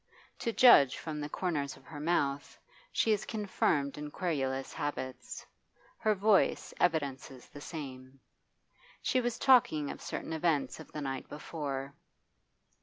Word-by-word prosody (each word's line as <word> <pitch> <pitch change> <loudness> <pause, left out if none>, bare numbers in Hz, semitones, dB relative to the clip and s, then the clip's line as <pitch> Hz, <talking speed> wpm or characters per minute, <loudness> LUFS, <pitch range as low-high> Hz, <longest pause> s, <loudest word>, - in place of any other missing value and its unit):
To 230 - -1
judge 220 - +7
from 155 -2 -5
the 145 - -4
corners 150 -5 -2
of - - -19
her 150 -2 -9
mouth, 145 -3 0 0.3
she 225 - +2
is 210 -1 +1
confirmed 165 -10 0
in 150 0 -5
querulous 135 -6 -2
habits; 130 -4 -5 0.5
her 215 -1 +2
voice 205 0 +2
evidences 140 -6 -1
the 145 - -11
same. 135 -4 -8 0.8
She 255 - +2
was 240 -1 -1
talking 240 - +4
of - - -9
certain 160 - -5
events 155 -5 0
of - - -11
the 150 - -5
night 135 -2 -4
before. 140 -3 -5
150 Hz, 135 wpm, -32 LUFS, 140-180 Hz, 0.8 s, judge